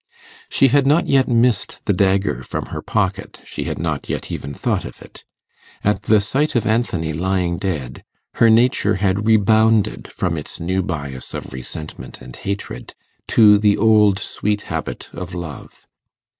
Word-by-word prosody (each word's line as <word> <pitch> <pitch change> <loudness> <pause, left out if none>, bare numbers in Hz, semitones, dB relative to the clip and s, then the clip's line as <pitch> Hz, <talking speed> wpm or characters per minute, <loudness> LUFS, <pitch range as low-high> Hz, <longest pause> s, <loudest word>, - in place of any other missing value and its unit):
She 135 - +4
had 140 +1 +3
not 150 +4 +3
yet 135 -2 +3
missed 120 -3 +1
the 100 - +2
dagger 95 +1 +1
from - - -5
her - - -4
pocket; - - -2
she - - -5
had - - -3
not - - -3
yet - - -4
even 70 - -5
thought 70 - -1
of - - -9
it. - - -15 0.6
At 105 -1 +1
the 105 0 +4
sight 135 +10 -1
of 115 -3 +1
Anthony 100 -8 0
lying 90 +1 -1
dead, 75 -10 -4 0.4
her 115 - +7
nature 110 -2 +3
had 100 +1 0
rebounded 110 - +3
from 85 -3 -2
its 75 - -9
new 95 +3 -1
bias 70 -8 -5
of - - -7
resentment 70 +4 -8
and 65 -1 -11
hatred 100 +1 -6 0.3
to 105 -2 +6
the 105 -1 +3
old 105 -2 +4
sweet 105 +1 -2
habit - - -4
of 90 0 -7
love. 85 -5 -8
100 Hz, 160 wpm, -20 LUFS, 85-110 Hz, 0.6 s, her